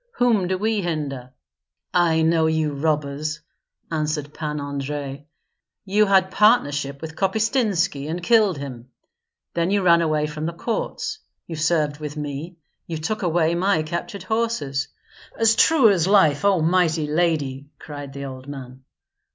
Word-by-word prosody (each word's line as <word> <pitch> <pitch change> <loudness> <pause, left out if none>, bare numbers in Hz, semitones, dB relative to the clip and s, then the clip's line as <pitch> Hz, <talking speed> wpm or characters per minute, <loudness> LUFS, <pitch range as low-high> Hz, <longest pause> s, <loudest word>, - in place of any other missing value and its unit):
Whom 225 -7 +2
do 185 +1 0
we 215 +1 0
hinder?" 145 -7 -4 0.6
"I 165 -2 +3
know 160 0 +3
you 160 -2 0
robbers!" 150 +1 -1 0.5
answered 150 -2 -2
Pan 150 -1 -4
Andrei. 140 0 -5 0.6
"You 205 +2 +3
had 190 -1 +3
partnership 145 - +2
with 160 0 -6
Kopystynski, 195 - 0
and 170 +2 -4
killed 215 -5 +4
him; 130 -3 -8 0.6
then 170 +1 0
you 200 0 +1
ran 170 -1 +5
away 155 -2 +1
from 150 +1 -4
the 170 - -3
courts, 230 - -3 0.3
you 165 - -6
served 155 -2 0
with 150 0 -6
me, 150 +4 -5 0.3
you 165 - -4
took 210 +8 -3
away 170 -2 +2
my 180 -1 +1
captured 170 +5 -5
horses. 185 -11 -1 0.5
"As 225 0 +4
true 265 -5 +5
as 180 -3 +1
life! 160 -8 +4
O 195 -4 +4
Mighty 165 -2 +2
Lady!" 150 -4 -1
cried 145 -2 -8
the 140 0 -6
old 130 0 -8
man. 130 -2 -9
160 Hz, 145 wpm, -23 LUFS, 145-185 Hz, 0.6 s, ran